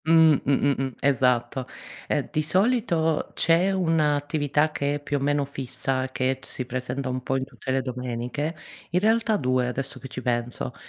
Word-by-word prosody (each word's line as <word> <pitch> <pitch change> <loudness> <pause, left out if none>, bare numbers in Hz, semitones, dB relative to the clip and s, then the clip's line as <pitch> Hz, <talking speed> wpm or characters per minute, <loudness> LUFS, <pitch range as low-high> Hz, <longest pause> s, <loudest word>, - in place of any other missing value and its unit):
Mh, 160 -1 +6
mh-mh-mh, 135 -2 +1
esatto. 130 -1 +1 0.4
Eh, - - 0
di 155 - +1
solito 170 -2 +1
c'è 170 +4 +3
1 165 -5 +2
attività 145 +1 0
che 145 -1 -1
è - - -3
più 145 0 -2
o - - -2
meno 145 +1 +1
fissa, 130 -1 -2
che 130 0 -1
t - - -14
si 130 - -4
presenta 130 +2 -3
un 130 0 -2
po' 130 - -1
in 130 - -2
tutte 130 -1 -10
le 130 0 +2
domeniche, 125 +5 -3 0.4
in 175 - +3
realtà 220 +1 +2
2, 130 -3 +1
adesso 135 +2 -4
che 135 - -8
ci 125 0 -7
penso. 120 0 -2
140 Hz, 175 wpm, -25 LUFS, 130-155 Hz, 0.4 s, Mh